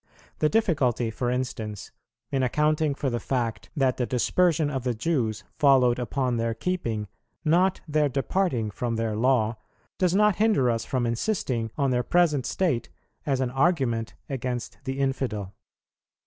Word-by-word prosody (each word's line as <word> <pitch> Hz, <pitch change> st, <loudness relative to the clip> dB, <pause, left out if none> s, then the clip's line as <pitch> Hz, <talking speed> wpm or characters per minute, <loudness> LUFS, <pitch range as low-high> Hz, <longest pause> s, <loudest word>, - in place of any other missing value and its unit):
The 155 Hz, -, +3 dB
difficulty, 140 Hz, -, +1 dB
for 120 Hz, +2 st, -2 dB
instance, 115 Hz, -5 st, -4 dB, 0.4 s
in 135 Hz, -, +1 dB
accounting 150 Hz, +3 st, +1 dB
for 135 Hz, -2 st, -2 dB
the 120 Hz, -, -1 dB
fact 120 Hz, -4 st, -2 dB
that 135 Hz, -3 st, +2 dB
the 125 Hz, -, -1 dB
dispersion 155 Hz, +5 st, +2 dB
of 135 Hz, -3 st, -3 dB
the 125 Hz, -2 st, -1 dB
Jews 115 Hz, -4 st, -1 dB, 0.2 s
followed 130 Hz, -4 st, +5 dB
upon 125 Hz, 0 st, -1 dB
their 115 Hz, 0 st, -1 dB
keeping, 115 Hz, -, -2 dB, 0.4 s
not 180 Hz, +4 st, +3 dB
their 150 Hz, -1 st, +2 dB
departing 135 Hz, -, 0 dB
from 115 Hz, +4 st, -2 dB
their 115 Hz, -1 st, -1 dB
Law, 115 Hz, -1 st, +2 dB, 0.4 s
does 180 Hz, -1 st, +2 dB
not 210 Hz, -2 st, +4 dB
hinder 210 Hz, -, +3 dB
us 115 Hz, 0 st, -2 dB
from 125 Hz, -2 st, -1 dB
insisting 115 Hz, -, -1 dB
on 140 Hz, -3 st, +1 dB
their 125 Hz, -1 st, +2 dB
present 150 Hz, -1 st, +2 dB
state 145 Hz, -12 st, 0 dB, 0.4 s
as 135 Hz, -2 st, +1 dB
an 125 Hz, -2 st, -1 dB
argument 135 Hz, -6 st, +1 dB
against 125 Hz, -2 st, -4 dB
the 135 Hz, 0 st, -3 dB
infidel. 130 Hz, -8 st, -2 dB
130 Hz, 150 wpm, -26 LUFS, 115-150 Hz, 0.4 s, followed